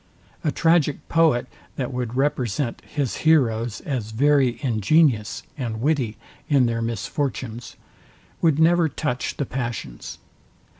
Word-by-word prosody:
A 155 Hz, -, +1 dB
tragic 165 Hz, -3 st, +2 dB
poet, 160 Hz, -7 st, +3 dB, 0.3 s
that 130 Hz, -1 st, -3 dB
would 125 Hz, -1 st, -3 dB
represent 130 Hz, -2 st, -1 dB
his 140 Hz, -5 st, -3 dB
heroes 120 Hz, -8 st, +2 dB
as 125 Hz, -7 st, -3 dB
very 135 Hz, +1 st, +3 dB
ingenious 120 Hz, 0 st, +2 dB, 0.2 s
and 115 Hz, -4 st, -3 dB
witty 125 Hz, -5 st, 0 dB, 0.3 s
in 140 Hz, -4 st, +4 dB
their 115 Hz, -1 st, -1 dB
misfortunes, 120 Hz, 0 st, -3 dB, 0.7 s
would 160 Hz, -4 st, +3 dB
never 165 Hz, 0 st, +4 dB
touch 135 Hz, -3 st, -3 dB
the 140 Hz, -, -1 dB
passions. 120 Hz, -, -5 dB
130 Hz, 115 wpm, -23 LUFS, 115-150 Hz, 0.7 s, in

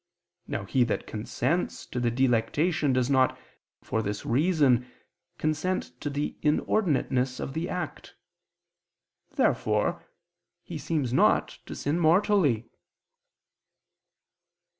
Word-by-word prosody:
Now -, -, -3 dB
he 130 Hz, -, +2 dB
that 115 Hz, -, -2 dB
consents 125 Hz, +10 st, -2 dB
to 125 Hz, -, -4 dB
the 120 Hz, -1 st, +1 dB
delectation 135 Hz, +6 st, +1 dB
does 130 Hz, -1 st, +2 dB
not, 130 Hz, -2 st, +3 dB, 0.5 s
for 110 Hz, -, -1 dB
this 105 Hz, -1 st, -4 dB
reason, 135 Hz, -3 st, +3 dB, 0.5 s
consent 155 Hz, +5 st, -1 dB
to 145 Hz, -, -2 dB
the 145 Hz, +1 st, -3 dB
inordinateness 145 Hz, -5 st, +1 dB
of 135 Hz, -, -4 dB
the 165 Hz, +3 st, -3 dB
act. 175 Hz, -4 st, -5 dB, 1.2 s
Therefore -, -, +1 dB, 0.6 s
he -, -, -7 dB
seems 140 Hz, -7 st, -1 dB
not -, -, +3 dB
to -, -, -6 dB
sin 150 Hz, +4 st, -1 dB
mortally. 165 Hz, -, +3 dB
140 Hz, 105 wpm, -27 LUFS, 125-160 Hz, 1.2 s, not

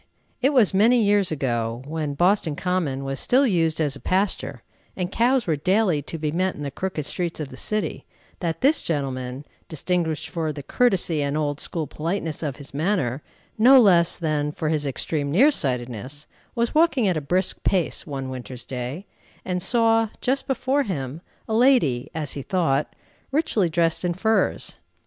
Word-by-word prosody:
It 270 Hz, +3 st, +3 dB
was 245 Hz, -10 st, +4 dB
many 230 Hz, +6 st, +5 dB
years 205 Hz, -4 st, +3 dB
ago, 120 Hz, -4 st, -2 dB
when 150 Hz, -1 st, -3 dB
Boston 175 Hz, -2 st, +2 dB
Common 165 Hz, -7 st, -1 dB
was 135 Hz, 0 st, -3 dB
still 265 Hz, +3 st, +3 dB
used 165 Hz, -8 st, +1 dB
as 145 Hz, -3 st, 0 dB
a -, -, -8 dB
pasture, 190 Hz, +2 st, -1 dB, 0.3 s
and 180 Hz, 0 st, -2 dB
cows 245 Hz, +2 st, +2 dB
were 160 Hz, -, +1 dB
daily 185 Hz, +1 st, +1 dB
to 160 Hz, +3 st, -7 dB
be 150 Hz, -1 st, -2 dB
met 185 Hz, +3 st, 0 dB
in 150 Hz, -, -7 dB
the 140 Hz, -, -4 dB
crooked 170 Hz, -1 st, -4 dB
streets 170 Hz, 0 st, -3 dB
of 150 Hz, -3 st, -4 dB
the 130 Hz, -, -10 dB
city, 210 Hz, +9 st, -3 dB, 0.3 s
that 165 Hz, -2 st, -3 dB
this 290 Hz, +4 st, +4 dB
gentleman, 135 Hz, -3 st, -3 dB, 0.2 s
distinguished 160 Hz, -1 st, -1 dB
for 165 Hz, -3 st, -2 dB
the 145 Hz, -1 st, -7 dB
courtesy 180 Hz, -, +1 dB
and 140 Hz, +1 st, -1 dB
old 145 Hz, -1 st, -1 dB
school 165 Hz, -3 st, -2 dB
politeness 160 Hz, 0 st, -3 dB
of 145 Hz, -5 st, -3 dB
his 140 Hz, -2 st, -12 dB
manner, 145 Hz, -5 st, 0 dB, 0.4 s
no 260 Hz, +4 st, +8 dB
less 175 Hz, -7 st, +4 dB
than 150 Hz, -3 st, -1 dB
for 155 Hz, +1 st, -3 dB
his 150 Hz, -2 st, 0 dB
extreme 140 Hz, +2 st, -1 dB
near 245 Hz, -, +5 dB
sightedness, 130 Hz, -, -2 dB, 0.3 s
was 235 Hz, -1 st, 0 dB
walking 305 Hz, -8 st, +3 dB
at 185 Hz, -, +1 dB
a 155 Hz, -, -1 dB
brisk 180 Hz, +6 st, 0 dB
pace, 185 Hz, -4 st, 0 dB
one 135 Hz, -3 st, -4 dB
winter's 125 Hz, -1 st, -7 dB
day, 130 Hz, +8 st, -5 dB, 0.4 s
and 180 Hz, -1 st, -2 dB
saw, 225 Hz, 0 st, +3 dB
just 270 Hz, +2 st, -1 dB
before 265 Hz, +1 st, +1 dB
him, 150 Hz, -, -4 dB, 0.3 s
a 220 Hz, -, -3 dB
lady, 225 Hz, -, +3 dB
as 155 Hz, -3 st, -1 dB
he 140 Hz, -, -5 dB
thought, 150 Hz, -2 st, 0 dB, 0.4 s
richly 250 Hz, -, +1 dB
dressed 165 Hz, +1 st, +1 dB
in 175 Hz, -1 st, 0 dB
furs. 220 Hz, +4 st, 0 dB
165 Hz, 175 wpm, -23 LUFS, 145-205 Hz, 0.4 s, no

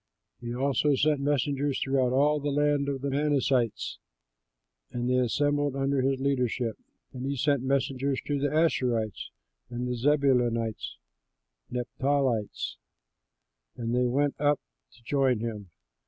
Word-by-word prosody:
He 120 Hz, -1 st, -6 dB
also 140 Hz, +2 st, +2 dB
sent 145 Hz, +2 st, +2 dB
messengers 140 Hz, 0 st, 0 dB
throughout 135 Hz, -2 st, +1 dB
all 145 Hz, +3 st, +3 dB
the 145 Hz, 0 st, -2 dB
land 145 Hz, 0 st, +1 dB
of 135 Hz, -2 st, -3 dB
the 140 Hz, 0 st, -2 dB
Manassites, 140 Hz, -4 st, 0 dB, 0.9 s
and 120 Hz, 0 st, -3 dB
they 125 Hz, 0 st, +2 dB
assembled 145 Hz, +3 st, +1 dB
under 135 Hz, 0 st, +1 dB
his 135 Hz, 0 st, +1 dB
leadership; 125 Hz, -4 st, 0 dB, 0.4 s
and 125 Hz, -1 st, -6 dB
he 140 Hz, +1 st, -1 dB
sent 140 Hz, 0 st, +1 dB
messengers 135 Hz, 0 st, 0 dB
to 145 Hz, -1 st, -1 dB
the 145 Hz, -, +1 dB
Asherites, 125 Hz, -, 0 dB, 0.4 s
the 125 Hz, +1 st, -3 dB
Zebulunites, 125 Hz, -4 st, +1 dB, 0.7 s
and 125 Hz, 0 st, -1 dB
the -, -, -6 dB, 0.2 s
Naphtalites, 130 Hz, -6 st, 0 dB, 1.0 s
and 115 Hz, 0 st, -2 dB
they 125 Hz, 0 st, +2 dB
went 140 Hz, +3 st, +1 dB
up 145 Hz, -1 st, +3 dB, 0.4 s
to 120 Hz, -, -22 dB
join 135 Hz, -1 st, +2 dB
him. 105 Hz, -3 st, -5 dB
135 Hz, 135 wpm, -28 LUFS, 125-145 Hz, 1.0 s, all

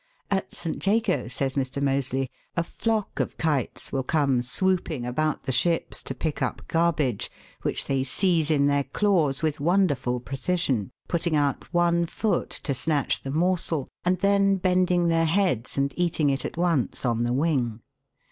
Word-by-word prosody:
At 195 Hz, -1 st, -1 dB
St. 165 Hz, -2 st, -3 dB
Jago, 205 Hz, -, +1 dB
says 135 Hz, +2 st, -1 dB
Mr. 135 Hz, -1 st, -2 dB
Moseley, 135 Hz, -1 st, 0 dB, 0.3 s
a 170 Hz, -, +2 dB
flock 220 Hz, +4 st, -2 dB
of -, -, -2 dB
kites 150 Hz, -6 st, -1 dB
will 135 Hz, -, 0 dB
come 135 Hz, -2 st, +1 dB
swooping 165 Hz, 0 st, 0 dB
about 155 Hz, +5 st, -1 dB
the 135 Hz, -, -2 dB
ships 165 Hz, +7 st, 0 dB
to -, -, -5 dB
pick 155 Hz, -3 st, -3 dB
up -, -, -2 dB
garbage, 155 Hz, -9 st, +1 dB, 0.3 s
which -, -, 0 dB
they 135 Hz, -1 st, 0 dB
seize 165 Hz, 0 st, +1 dB
in 145 Hz, -3 st, +3 dB
their 140 Hz, 0 st, +2 dB
claws 160 Hz, -3 st, +1 dB
with 155 Hz, -2 st, 0 dB
wonderful 145 Hz, -7 st, +1 dB
precision, 130 Hz, -, -1 dB, 0.2 s
putting 170 Hz, -1 st, 0 dB
out 145 Hz, -2 st, 0 dB
one 170 Hz, 0 st, +2 dB
foot 205 Hz, +1 st, -1 dB
to 140 Hz, -, -3 dB
snatch 145 Hz, +2 st, 0 dB
the 135 Hz, -, -6 dB
morsel 165 Hz, -2 st, 0 dB, 0.2 s
and 180 Hz, +1 st, +2 dB
then 200 Hz, 0 st, +4 dB
bending 180 Hz, -1 st, +2 dB
their 165 Hz, 0 st, +3 dB
heads 165 Hz, -, +1 dB
and 140 Hz, 0 st, +1 dB
eating 165 Hz, -5 st, +1 dB
it 135 Hz, -1 st, -2 dB
at -, -, -5 dB
once 170 Hz, -8 st, 0 dB
on 120 Hz, -1 st, +1 dB
the 120 Hz, -, 0 dB
wing. 130 Hz, -5 st, 0 dB
155 Hz, 165 wpm, -26 LUFS, 135-175 Hz, 0.3 s, then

